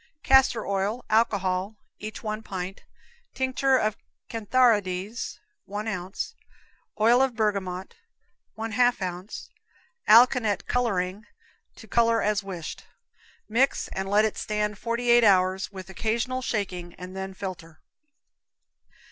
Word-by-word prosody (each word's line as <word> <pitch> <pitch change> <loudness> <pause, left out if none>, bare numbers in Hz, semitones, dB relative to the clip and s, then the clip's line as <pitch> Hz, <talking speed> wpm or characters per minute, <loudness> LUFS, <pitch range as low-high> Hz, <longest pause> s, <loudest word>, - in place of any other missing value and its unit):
Castor 265 -3 +4
oil, 200 +5 -1
alcohol, 200 -2 +1 0.2
each 215 +2 -7
1 215 0 -3
pint; 190 -2 -6 0.5
tinct. 260 -1 -2 0.7
cantharides, 215 -3 +1 0.3
1 205 +2 -5
ounce; 185 -2 -4 0.7
oil 240 +5 +5
bergamot, 200 -5 -2 0.6
1/2 225 +2 +2
ounce; 185 +1 -6 0.6
alkanet 230 -2 +5
coloring, 205 -4 -1 0.5
to 220 - -13
color 230 +1 +3
as 210 0 +1
wished. 180 -5 -7 0.6
Mix 245 +5 +1
and 195 0 -4
let 210 +2 +4
it 220 - -2
stand 210 -1 -2
forty 235 +1 0
eight 240 0 +6
hours, 190 -2 +3
with 190 -2 -9
occasional 230 +6 -1
shaking, 185 -7 -3
and 180 +1 -9
then 190 0 -5
filter. 175 -5 -8
210 Hz, 105 wpm, -26 LUFS, 190-230 Hz, 0.7 s, eight